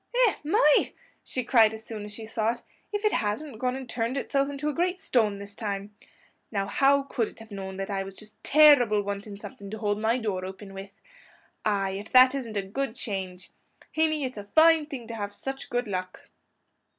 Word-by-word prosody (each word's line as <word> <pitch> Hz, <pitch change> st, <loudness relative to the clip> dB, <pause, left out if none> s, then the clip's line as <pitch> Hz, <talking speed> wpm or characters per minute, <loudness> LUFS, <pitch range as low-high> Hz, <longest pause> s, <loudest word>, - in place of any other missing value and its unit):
"Eh, 430 Hz, -, +3 dB
my!" 300 Hz, -1 st, +4 dB, 0.3 s
she 255 Hz, -, -3 dB
cried 225 Hz, -3 st, +5 dB
as 220 Hz, 0 st, -11 dB
soon 215 Hz, -2 st, -6 dB
as 210 Hz, -, -8 dB
she 220 Hz, +1 st, -7 dB
saw 225 Hz, +1 st, 0 dB
it; 240 Hz, -, -14 dB, 0.3 s
"if 415 Hz, +1 st, -2 dB
it 425 Hz, -, +4 dB
hasn't 220 Hz, +4 st, -2 dB
gone 250 Hz, 0 st, 0 dB
and 265 Hz, -1 st, -6 dB
turned 235 Hz, +2 st, -2 dB
itself 275 Hz, 0 st, 0 dB
into 285 Hz, +1 st, -4 dB
a 300 Hz, -, 0 dB
great 360 Hz, +4 st, 0 dB
stone 220 Hz, -, +1 dB
this 200 Hz, 0 st, -9 dB
time! 205 Hz, -1 st, -4 dB, 0.6 s
Now, 200 Hz, -3 st, 0 dB
how 275 Hz, +6 st, +3 dB
could 245 Hz, -5 st, -1 dB
it -, -, -13 dB
have 225 Hz, 0 st, -13 dB
known 190 Hz, -1 st, -6 dB
that 195 Hz, +1 st, -4 dB
I 195 Hz, -1 st, -1 dB
was 195 Hz, 0 st, -7 dB
just 215 Hz, +1 st, -13 dB
terrible 275 Hz, -9 st, +6 dB
wanting 200 Hz, 0 st, -5 dB
something 200 Hz, -1 st, -9 dB
to 220 Hz, -, -5 dB
hold 205 Hz, -1 st, -1 dB
my 225 Hz, +2 st, +2 dB
door 205 Hz, -6 st, -2 dB
open 195 Hz, +1 st, -8 dB
with? 195 Hz, +1 st, -8 dB, 0.8 s
Ay, 200 Hz, -2 st, +1 dB
if 210 Hz, -, -10 dB
that 255 Hz, +1 st, +8 dB
isn't 235 Hz, -6 st, -4 dB
a 200 Hz, -, 0 dB
good 225 Hz, +5 st, -3 dB
change! 190 Hz, -6 st, -5 dB, 0.4 s
Hinny, 310 Hz, -2 st, +1 dB
it's 255 Hz, -4 st, -4 dB
a -, -, -6 dB
fine 315 Hz, +7 st, +5 dB
thing 255 Hz, -7 st, -7 dB
to 230 Hz, -, -6 dB
have 205 Hz, -2 st, -4 dB
such 270 Hz, 0 st, -5 dB
good 245 Hz, -1 st, -1 dB
luck." 185 Hz, -2 st, -5 dB
220 Hz, 210 wpm, -27 LUFS, 200-270 Hz, 0.8 s, that